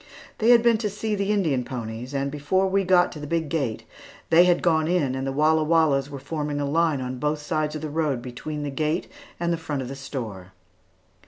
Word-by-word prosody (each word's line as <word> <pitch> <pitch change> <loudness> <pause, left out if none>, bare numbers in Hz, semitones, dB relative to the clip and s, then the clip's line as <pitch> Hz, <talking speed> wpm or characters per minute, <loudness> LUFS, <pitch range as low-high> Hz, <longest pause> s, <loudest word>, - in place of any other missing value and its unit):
They 225 +1 +3
had 235 -1 +7
been 235 -2 +4
to 215 -2 -1
see 210 +2 -3
the 200 0 0
Indian 160 -11 +1
ponies, 120 0 -6
and 140 0 -1
before 150 +7 +1
we 195 +1 +1
got 180 -1 +4
to 155 - -8
the 150 - -6
big 165 -1 -1
gate, 140 -8 -2 0.5
they 170 +2 +7
had 175 -1 +2
gone 160 -2 +3
in 165 -7 +1
and 135 +1 -3
the - - -1
Walla 155 +3 +3
Wallas 150 -4 +2
were 140 - -6
forming 150 +1 -3
in 145 0 -2
line 160 -4 +2
on 125 0 -4
both 150 +2 0
sides 155 -1 -2
of 155 - -5
the - - -2
road 150 -5 0
between 130 +5 -6
the 145 - -3
gate 155 +5 -1 0.3
and 170 0 0
the - - -1
front 150 -4 -3
of 125 - -7
the 135 - -6
store. 110 -9 -7
150 Hz, 230 wpm, -24 LUFS, 135-170 Hz, 0.5 s, had